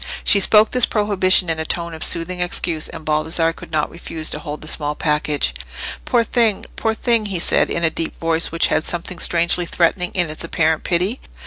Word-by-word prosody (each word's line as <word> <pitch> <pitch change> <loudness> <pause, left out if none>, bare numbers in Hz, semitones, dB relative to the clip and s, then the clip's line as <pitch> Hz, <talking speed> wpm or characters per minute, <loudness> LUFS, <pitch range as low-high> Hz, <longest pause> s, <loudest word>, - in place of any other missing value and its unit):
She 200 - +6
spoke 210 +2 +5
this 250 -1 +2
prohibition 195 -4 +2
in 165 -1 -2
a - - -1
tone 170 +1 -2
of 160 - -2
soothing 175 +2 +1
excuse, 175 -2 -2
and 160 - -10
Baldassarre 160 +2 +1
could - - -12
not 155 -2 -1
refuse 165 -2 -6
to - - -3
hold 150 -1 -7
the 155 - -7
small 150 -1 -1
package. 150 - 0 0.5
"Poor 240 -2 +2
thing! 230 -3 0
poor 220 0 -1
thing!" 230 -2 +1
he 195 -3 -3
said, 170 - +4
in 170 - -2
a 160 - +2
deep 165 - -4
voice 165 0 0
which 165 - +1
had 155 - +1
something 175 +1 -3
strangely 170 +1 +3
threatening 180 +1 0
in 175 -4 0
its 155 - -7
apparent 160 -1 0
pity. 185 +8 -1
170 Hz, 205 wpm, -19 LUFS, 160-185 Hz, 0.5 s, She